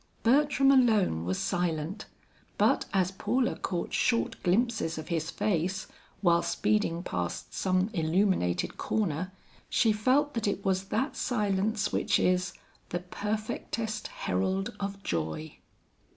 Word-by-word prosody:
Bertram 275 +2 +4
alone 215 - +3
was 95 +1 -1
silent, 175 +2 -2 0.5
but - - +3
as 185 -2 +2
Paula 245 +6 0
caught 175 -4 -3
short 235 -2 +1
glimpses 200 -3 +1
of 155 - -7
his 160 -2 -1
face, 185 -1 -1 0.4
while 170 -3 +4
speeding 210 -5 0
past 90 - -4
some 185 +2 +1
illuminated 165 - +1
corner, 150 - -1 0.4
she 225 - +3
felt 260 +7 +2
that 230 -3 -1
it 200 0 -2
was 190 0 +1
that 265 +8 -1
silence 210 -2 0
which - - +2
is 180 0 +1 0.4
"the 175 - -2
perfectest 215 +3 -3
herald 190 - -1
of 200 0 -4
joy." 80 -2 -3
195 Hz, 125 wpm, -29 LUFS, 170-220 Hz, 0.5 s, Bertram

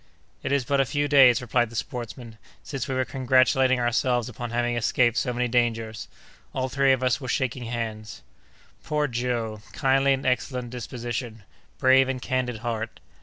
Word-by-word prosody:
"It - - -3
is 140 -3 +1
but 140 +2 +2
a - - +1
few 145 +2 -1
days," 130 -4 +6
replied 120 -1 +1
the 115 - -12
sportsman, 115 0 -6 0.2
"since 135 -3 -4
we 130 - -2
were 130 0 +1
congratulating 130 0 +3
ourselves 120 0 +1
upon 120 -1 -6
having 120 +1 0
escaped 120 +1 +2
so 125 +1 0
many 125 0 -1
dangers! 115 -2 -1 0.5
All 130 0 -1
three 135 +1 +3
of 130 -1 +1
us 130 +2 +1
were 130 - -6
shaking 130 -1 -1
hands!" 110 -2 -5 0.6
"Poor 150 -1 0
Joe! 120 -3 -2
kindly 135 +1 +3
and 135 - -3
excellent 125 -1 -1
disposition! 120 -2 -5 0.3
brave 130 0 +5
and 130 -1 -2
candid 125 -3 -2
heart! 115 -1 -3
125 Hz, 170 wpm, -25 LUFS, 120-130 Hz, 0.6 s, days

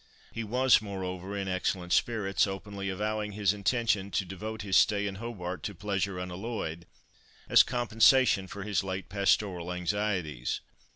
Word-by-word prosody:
He 115 - -4
was, 125 +2 +4
moreover, 95 -1 -5
in 100 -1 -3
excellent 90 -1 -1
spirits, 105 -4 +2
openly 100 0 -5
avowing 105 +2 -2
his 105 0 +2
intention 105 -1 0
to 100 - -1
devote 105 +4 -6
his 95 -2 0
stay 105 -2 +4
in 95 -1 -4
Hobart 95 -6 -5
to 100 - -5
pleasure 100 0 -2
unalloyed, 90 -2 -5 0.6
as - - +8
compensation 120 -3 +4
for 100 +1 -7
his 100 -2 0
late 95 +1 -4
pastoral 95 -3 +1
anxieties. 90 - -1
100 Hz, 140 wpm, -29 LUFS, 95-105 Hz, 0.6 s, as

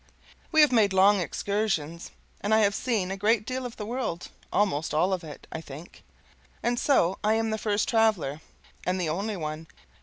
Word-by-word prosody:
We 315 -2 +6
have 300 - +6
made 215 -5 +3
long 195 +2 +5
excursions, 180 -4 -2 0.3
and 215 +2 +2
I 220 - +4
have 200 -1 +3
seen 205 -4 -1
a - - -2
great 210 +1 +2
deal 255 0 -3
of 235 - -12
the 210 - -5
world; 230 -7 -4 0.2
almost 160 -8 0
all 180 +5 +2
of 185 -2 -2
it, 150 -2 -10
I 160 - -5
think; 155 +3 -11 0.6
and 240 0 +1
so 190 - +2
I 215 +1 +3
am 225 0 0
the 220 - -2
first 210 -1 0
traveler, 210 - +1 0.4
and 185 +1 -1
the 170 -3 -1
only 200 +6 -2
one. 155 0 -5
200 Hz, 190 wpm, -27 LUFS, 170-220 Hz, 0.6 s, We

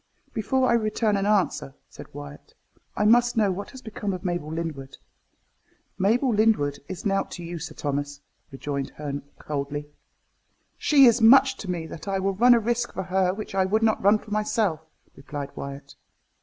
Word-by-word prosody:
"Before 255 +4 +1
I - - +3
return 215 -1 +1
an 200 0 0
answer," 195 -9 0
said - - -13
Wyat, 70 0 -11 0.4
"I 210 - +2
must 240 +2 +4
know 210 -3 +3
what 195 +2 -5
has 260 -1 -12
become 210 -2 -4
of 180 0 -7
Mabel 175 -4 -2
Lyndwood." 160 -5 -5 1.0
"Mabel 235 +6 +2
Lyndwood 205 -10 +2
is 185 +1 -7
nought 195 -1 0
to 175 - -7
you, 170 0 -6
Sir - - -7
Thomas," 145 0 -3 0.3
rejoined 140 0 -4
Herne 145 -1 -5 0.2
coldly. 145 0 -5 0.8
"She 285 -4 +5
is 235 -2 +6
so 225 - +3
much 265 +3 +7
to 195 - -7
me 170 -3 -2
that 160 +3 -9
I 195 -1 0
will 195 +1 0
run 240 +5 +6
a - - +3
risk 240 +2 -1
for 190 - -3
her 185 0 +1
which 205 +2 -7
I 190 -1 +2
would 215 +4 +1
not 220 -1 +2
run 205 +2 +5
for 210 0 -14
myself," 210 -5 0 0.3
replied 140 0 -7
Wyat. 140 0 -8
195 Hz, 185 wpm, -25 LUFS, 150-220 Hz, 1.0 s, much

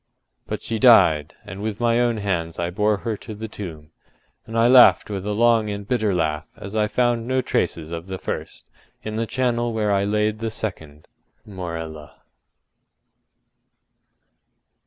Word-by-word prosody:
But - - -5
she 115 -1 -3
died; 80 - +5
and 95 +2 -8
with 105 -1 -3
my 120 0 +2
own 120 -2 +1
hands 85 -6 -2
I 85 0 -2
bore 105 +2 +1
her 115 -2 -1
to 110 - -9
the 110 +2 -6
tomb; 80 -8 -9 0.6
and 115 +1 -4
I 115 +1 +5
laughed 120 -6 +6
with 100 0 -4
a - - -1
long 115 0 +3
and 100 -1 -5
bitter 110 -4 +1
laugh 75 -2 -1
as 100 +2 -8
I 105 -1 +2
found 120 0 0
no 130 0 +1
traces 80 -2 -1
of 85 +1 -6
the 95 0 -5
first - - -6 0.4
in 110 0 -5
the 115 +1 -1
charnel 120 -2 0
where 105 -2 0
I 100 0 +2
laid 105 +1 0
the 115 0 -2
second, 80 -9 -6 0.4
Morella. 85 -6 -7
105 Hz, 160 wpm, -22 LUFS, 85-115 Hz, 0.6 s, laughed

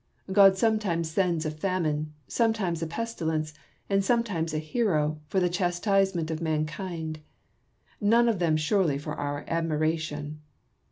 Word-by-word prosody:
God 195 -1 +7
sometimes 190 -7 +1
sends 170 -2 +1
a 155 - -1
famine, 155 -3 -1 0.2
sometimes 220 -8 0
a 165 - -1
pestilence, 160 -6 -2 0.3
and 195 0 +2
sometimes 195 -8 0
a 155 - -1
hci 155 +11 -3
o, 155 -6 +1
for 190 - +1
the 180 - +2
chastisement 180 -1 +1
of 160 +1 -3
mankind; 160 0 -3 0.8
none 230 +3 +4
of 225 -5 +1
them 165 -3 +2
surely 155 -1 +2
for 150 +1 -5
our 145 -1 -4
admiration. 155 -2 -1
165 Hz, 135 wpm, -27 LUFS, 155-195 Hz, 0.8 s, God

